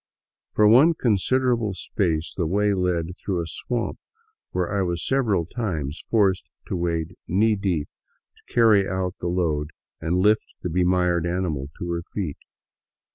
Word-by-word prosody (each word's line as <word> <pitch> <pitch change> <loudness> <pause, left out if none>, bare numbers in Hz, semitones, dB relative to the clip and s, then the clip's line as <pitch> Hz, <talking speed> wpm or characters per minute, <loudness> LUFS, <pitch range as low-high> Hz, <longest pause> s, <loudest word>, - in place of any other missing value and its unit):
For 105 - +5
one 140 +10 +6
considerable 120 -1 +1
space 85 -4 -1
the 85 -4 0
way 100 +4 +2
led 90 -2 -1
through 95 -3 -2
a 85 - -2
swamp, 120 +7 -3 0.5
where 90 -1 -2
I 100 - +1
was 85 -2 -1
several 110 -11 +1
times 80 - -4
forced 100 -5 +2 0.2
to - - -1
wade 85 -1 -2
knee 105 +4 +3
deep 95 -7 -1 0.5
to - - -25
carry 110 -4 +4
out 95 -1 -1
the 90 - -3
load 80 -4 0 0.3
and 85 +3 0
lift 105 +3 +2
the 90 - -1
bemired 90 -1 +2
animal 85 -6 -2
to 85 0 -4
her 85 0 -1
feet. 90 -9 -3
90 Hz, 150 wpm, -24 LUFS, 85-105 Hz, 0.5 s, one